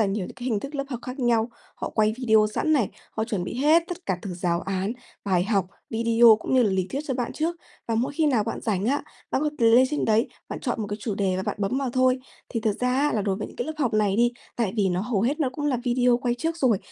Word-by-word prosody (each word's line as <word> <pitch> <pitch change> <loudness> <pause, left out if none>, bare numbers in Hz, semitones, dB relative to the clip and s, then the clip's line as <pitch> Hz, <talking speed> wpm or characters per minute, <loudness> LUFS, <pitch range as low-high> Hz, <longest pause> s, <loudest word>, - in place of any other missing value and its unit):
là 215 - +4
nhiều 195 -1 -2
những - - -10
cái 245 - -9
hình 215 -5 0
thức 280 +2 -7
lớp 275 -1 -1
học 250 -4 -4
khác 255 +2 -7
nhau, 235 -2 +2 0.2
họ - - -5
quay 215 -1 +3
video 220 -4 +4
sẵn 310 - +1
này, 250 -9 +3 0.2
họ 220 - -2
chuẩn 205 -6 -2
bị - - -5
hết 310 +6 +5
tất 355 0 -7
cả 185 -2 0
từ 185 -3 -5
giáo 170 -1 0
án, 195 +2 -2 0.3
bài 180 -3 +2
học, 200 -3 +1 0.2
video 230 0 +5
cũng - - -1
như 255 - +6
là 210 - +2
lý 190 -1 0
thuyết 275 - -2
cho 265 - -1
bạn 245 -1 -2
trước. 330 +2 -1 0.3
Và 230 - +1
mỗi 240 +5 0
khi 310 +1 +1
nào 245 -8 +2
bạn - - -4
rảnh 200 -3 -1
á, 285 +3 +1 0.3
bạn 270 - 0
có 300 - +1
lên 235 +2 +6
trên 300 - 0
đấy 220 +1 +2 0.2
bạn - - -5
chọn 245 -4 -2
một 210 - -2
cái 205 - -2
chủ 205 0 -2
đề 195 -2 0
và 190 - -2
bạn - - -3
bấm 200 +7 0
vào 270 -2 -1
thôi. 255 0 +3 0.3
Thì 230 - -2
thực 215 -2 -1
ra 250 - +2
á, 295 +1 +2
là 210 - 0
đối 195 -2 0
với 210 - -4
những - - -14
cái 240 - -3
lớp 315 - -3
học 250 -7 0
này 205 -2 +2
đi, 240 +1 +3 0.2
tại 225 -6 0
vì 200 -3 +2
nó 180 0 0
hầu 210 -1 -1
hết 285 +7 0
nó 275 - +2
cũng 290 +3 -3
là 275 -3 +2
video 245 0 +3
quay 245 -2 0
trước 325 +6 -2
rồi, 250 - +3
230 Hz, 295 wpm, -25 LUFS, 205-260 Hz, 0.3 s, như